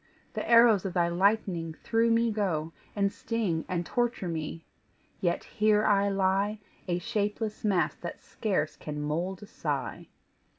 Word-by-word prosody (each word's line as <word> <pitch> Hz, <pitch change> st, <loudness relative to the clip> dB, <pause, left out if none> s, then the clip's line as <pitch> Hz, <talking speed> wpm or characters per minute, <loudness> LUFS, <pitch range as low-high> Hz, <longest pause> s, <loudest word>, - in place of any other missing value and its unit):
The -, -, -4 dB
arrows 230 Hz, -4 st, +7 dB
of 190 Hz, -2 st, -4 dB
thy 170 Hz, -1 st, +3 dB
lightning 175 Hz, -3 st, +1 dB
through 230 Hz, +5 st, +1 dB
me 230 Hz, 0 st, +3 dB
go, 165 Hz, -7 st, -1 dB, 0.2 s
And 200 Hz, -1 st, +1 dB
sting 200 Hz, -9 st, -1 dB
and 175 Hz, -1 st, -2 dB
torture 240 Hz, -4 st, -1 dB
me 165 Hz, 0 st, -4 dB, 0.5 s
yet 175 Hz, -2 st, 0 dB
here 215 Hz, 0 st, +2 dB
I 200 Hz, -1 st, +4 dB
lie 195 Hz, +2 st, +1 dB, 0.3 s
A 175 Hz, -1 st, +1 dB
shapeless 210 Hz, +2 st, -2 dB
mass 195 Hz, -5 st, +2 dB
that -, -, -6 dB
scarce 190 Hz, -8 st, -2 dB
can 150 Hz, -1 st, -6 dB
mould 170 Hz, +6 st, -2 dB
a -, -, -7 dB
sigh." -, -, -4 dB
195 Hz, 145 wpm, -29 LUFS, 170-215 Hz, 0.5 s, arrows